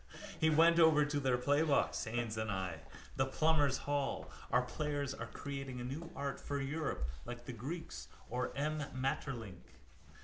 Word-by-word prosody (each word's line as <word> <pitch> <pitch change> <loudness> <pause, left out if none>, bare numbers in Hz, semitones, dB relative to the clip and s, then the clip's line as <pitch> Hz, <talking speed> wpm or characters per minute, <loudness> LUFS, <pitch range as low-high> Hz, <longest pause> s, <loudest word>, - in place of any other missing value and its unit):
We 160 - +5
went 165 +2 +6
over 160 -2 +7
to 145 0 0
their 130 -3 +2
playbox, 145 +3 +2
Haines 120 -2 -1
and 110 0 -2
I, 95 -4 -2 0.4
the 130 - +3
plumbers' 145 -1 +3
hall. 145 -1 -1 0.2
Our 125 - +4
players 145 +1 -2
are 115 -4 -5
creating 135 +1 -5
a - - -4
new 150 +7 -5
art 140 0 -3
for 145 0 -3
Europe 140 - -2 0.2
like 120 0 -7
the 125 - -5
Greeks 120 - -5 0.2
or 125 +1 -1
M. 150 +1 0
Maeterlinck. 130 - -3
135 Hz, 160 wpm, -36 LUFS, 120-150 Hz, 0.4 s, over